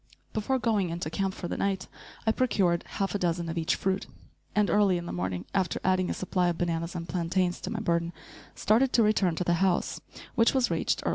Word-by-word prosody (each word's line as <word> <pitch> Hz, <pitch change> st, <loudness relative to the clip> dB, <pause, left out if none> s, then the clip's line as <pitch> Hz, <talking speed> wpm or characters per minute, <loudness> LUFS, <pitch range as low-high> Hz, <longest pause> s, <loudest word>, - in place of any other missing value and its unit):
Before 220 Hz, +5 st, 0 dB
going 215 Hz, -7 st, +1 dB
into 165 Hz, -1 st, -4 dB
camp 190 Hz, +2 st, -1 dB
for 175 Hz, -, -5 dB
the -, -, -3 dB
night, 195 Hz, -1 st, -1 dB, 0.4 s
I 220 Hz, -, +4 dB
procured 195 Hz, -8 st, +2 dB
half 195 Hz, -1 st, -2 dB
a 205 Hz, -, -1 dB
dozen 170 Hz, -1 st, 0 dB
of 165 Hz, -, -3 dB
each 160 Hz, -, +1 dB
fruit, 190 Hz, 0 st, -1 dB, 0.5 s
and, 210 Hz, -1 st, +4 dB
early 200 Hz, -3 st, +3 dB
in 175 Hz, -, -5 dB
the -, -, -5 dB
morning, 90 Hz, 0 st, -3 dB
after 190 Hz, -3 st, 0 dB
adding 185 Hz, 0 st, +2 dB
a -, -, 0 dB
supply 180 Hz, -1 st, 0 dB
of 175 Hz, -1 st, 0 dB
bananas 170 Hz, 0 st, -2 dB
and 170 Hz, -1 st, -4 dB
plantains 180 Hz, +1 st, 0 dB
to -, -, -4 dB
my 215 Hz, -1 st, -3 dB
burden, 170 Hz, -4 st, 0 dB, 0.4 s
started 245 Hz, +5 st, +3 dB
to 230 Hz, -, +5 dB
return 200 Hz, -5 st, +2 dB
to 180 Hz, -, -1 dB
the 175 Hz, -, +2 dB
house, 185 Hz, -2 st, +1 dB, 0.3 s
which 230 Hz, +3 st, +3 dB
was 260 Hz, -2 st, +2 dB
reached -, -, +3 dB
early -, -, 0 dB
in -, -, -4 dB
the -, -, +2 dB
evening. -, -, -1 dB
185 Hz, 235 wpm, -28 LUFS, 170-205 Hz, 0.5 s, to